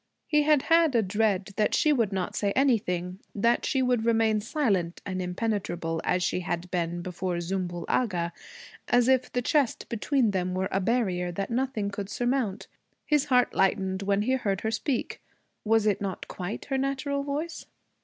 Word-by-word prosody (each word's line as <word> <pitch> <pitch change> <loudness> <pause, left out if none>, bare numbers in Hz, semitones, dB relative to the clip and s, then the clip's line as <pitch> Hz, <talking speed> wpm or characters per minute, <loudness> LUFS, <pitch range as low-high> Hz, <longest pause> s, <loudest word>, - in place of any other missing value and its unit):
He 300 -1 +3
had 295 -2 +3
had 330 -4 +4
a 225 - +4
dread 200 -1 0
that 215 - +2
she 305 - +4
would 230 -7 +1
not 190 -2 -2
say 200 -1 0
anything, 190 -9 +1 0.2
that 230 +4 +2
she 265 -1 +1
would 250 -3 +1
remain 225 -2 +2
silent 205 - 0
and 185 -2 -3
impenetrable, 180 -4 -2
as 180 - +1
she 180 - 0
had 175 0 -4
been 175 -1 -2
before 180 0 -3
Zümbül 175 0 -3
Agha, 175 -8 0 0.5
as 245 0 +3
if 260 -1 +2
the 245 - -1
chest 280 -1 +1
between 235 0 +1
them 185 -1 -1
were 190 +1 -1
a 195 - +1
barrier 185 -5 0
that 195 +5 -3
nothing 235 -5 -1
could 200 -1 -5
surmount. 240 -6 -1 0.4
His 300 -2 +2
heart 250 -3 +3
lightened 190 0 +1
when 200 +1 +1
he 250 - 0
heard 205 -7 0
her 220 - -1
speak. 240 +3 -2 0.4
Was 225 0 +3
it 205 -2 +1
not 195 -2 -4
quite 185 +3 -5
her 270 -1 -1
natural 275 +1 -1
voice? 290 +4 -4
210 Hz, 175 wpm, -27 LUFS, 185-250 Hz, 0.5 s, had